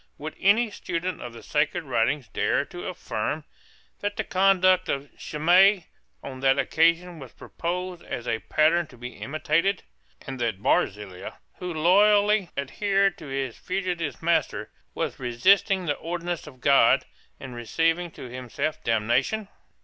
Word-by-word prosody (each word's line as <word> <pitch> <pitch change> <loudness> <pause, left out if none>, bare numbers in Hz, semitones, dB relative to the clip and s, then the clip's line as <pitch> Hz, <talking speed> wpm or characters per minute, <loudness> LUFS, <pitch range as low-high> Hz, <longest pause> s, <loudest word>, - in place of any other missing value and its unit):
Would 155 +1 -7
any 215 +4 +3
student 180 -2 -4
of 120 - -7
the 115 - -11
sacred 155 +3 0
writings 135 0 0
dare - - 0
to - - -8
affirm - - -3 0.6
that 205 0 -3
the - - 0
conduct 185 -1 +3
of 140 0 -3
Shimei 180 +4 +3 0.3
on 130 -1 -7
that 135 0 +3
occasion 170 +1 +2
was 130 -4 -11
proposed 180 +1 -5
as 120 - -5
a 115 -1 0
pattern 160 +6 +2
to 125 - -16
be 125 +1 -6
imitated, 160 +6 0 0.4
and 135 -1 -6
that 115 -5 -1
Barzillai, 95 -2 -1 0.3
who 180 0 -4
loyally 205 +4 +4
adhered 195 - +1
to 155 - -9
his 135 -3 -3
fugitive 180 -5 -3
master, 170 0 0 0.2
was - - -3
resisting 185 - +3
the 150 - +1
ordinance 170 +1 -4
of 130 -4 -13
God, 140 0 +5 0.3
and 130 -2 -8
receiving 165 +9 0
to 135 - -10
himself 130 +5 -4
damnation? 120 - 0
165 Hz, 140 wpm, -25 LUFS, 135-185 Hz, 0.6 s, God